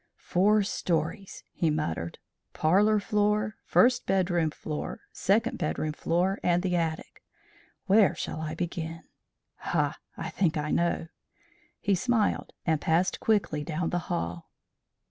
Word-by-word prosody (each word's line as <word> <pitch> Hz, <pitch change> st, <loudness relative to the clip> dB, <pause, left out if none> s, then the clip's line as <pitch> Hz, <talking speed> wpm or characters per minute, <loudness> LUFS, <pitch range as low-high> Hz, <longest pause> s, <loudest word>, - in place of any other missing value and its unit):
"Four 205 Hz, +3 st, +3 dB
stories!" 170 Hz, 0 st, -2 dB
he 165 Hz, -, +1 dB
muttered. 85 Hz, -, -2 dB, 0.4 s
"Parlour 205 Hz, +7 st, +3 dB
floor, 210 Hz, 0 st, 0 dB
first 245 Hz, 0 st, +3 dB
bedroom 180 Hz, -4 st, +2 dB
floor, 150 Hz, 0 st, -5 dB
second 230 Hz, +5 st, +1 dB
bedroom 155 Hz, 0 st, -1 dB
floor, 180 Hz, +5 st, 0 dB
and 175 Hz, +1 st, +2 dB
the 180 Hz, -2 st, 0 dB
attic! 165 Hz, -2 st, -3 dB, 0.6 s
Where 205 Hz, 0 st, +5 dB
shall 155 Hz, -, -4 dB
I 155 Hz, 0 st, -4 dB
begin? 165 Hz, -1 st, -4 dB, 0.5 s
Ha! -, -, -1 dB, 0.2 s
I -, -, -4 dB
think 175 Hz, -4 st, +1 dB
I 150 Hz, 0 st, -2 dB
know," 170 Hz, -1 st, 0 dB, 0.7 s
he 200 Hz, -, +1 dB
smiled, 220 Hz, +2 st, +1 dB
and 160 Hz, -3 st, +1 dB
passed 170 Hz, +4 st, +1 dB
quickly 195 Hz, -9 st, +1 dB
down 165 Hz, +2 st, -2 dB
the 175 Hz, -, +1 dB
hall. 85 Hz, +1 st, -3 dB
175 Hz, 125 wpm, -28 LUFS, 160-205 Hz, 0.7 s, Where